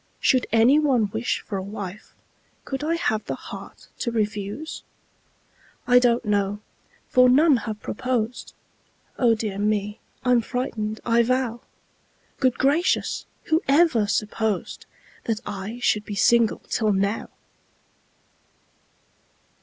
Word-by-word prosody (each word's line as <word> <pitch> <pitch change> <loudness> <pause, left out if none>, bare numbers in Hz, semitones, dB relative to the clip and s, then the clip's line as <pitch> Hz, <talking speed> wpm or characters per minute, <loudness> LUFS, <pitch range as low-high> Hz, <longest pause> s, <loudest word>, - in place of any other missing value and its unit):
Should 255 -1 +2
any 235 +6 +5
one 250 -9 +2
wish 225 +3 -1
for 195 - -4
a - - -4
wife, 200 0 -8 0.5
Could 270 +1 -4
I 325 +2 +1
have 220 -10 -1
the - - -3
heart - - -11
to 235 - -1
refuse? 210 +5 -3 1.0
I 245 0 +6
don't 240 -1 +2
know 205 -1 0 0.5
for 250 0 +5
none 285 +2 +5
have 215 -1 -6
proposed 245 0 -3 0.6
Oh, 235 -3 +4
dear 210 -3 -4
me! 210 0 -1 0.3
I'm 250 -1 +4
frightened, 220 -3 -3
I 235 0 +4
vow! 245 -1 0 0.8
Good 255 -3 +2
gracious! 295 +7 +1 0.2
who 320 +2 +1
ever 275 -7 +4
supposed 215 -1 -2 0.4
That 225 -2 -1
I 205 +3 -5
should 210 -3 +2
be 205 - -5
single 235 +2 +3
till 215 -2 +1
now? 200 +3 -1
225 Hz, 120 wpm, -24 LUFS, 210-255 Hz, 1.0 s, I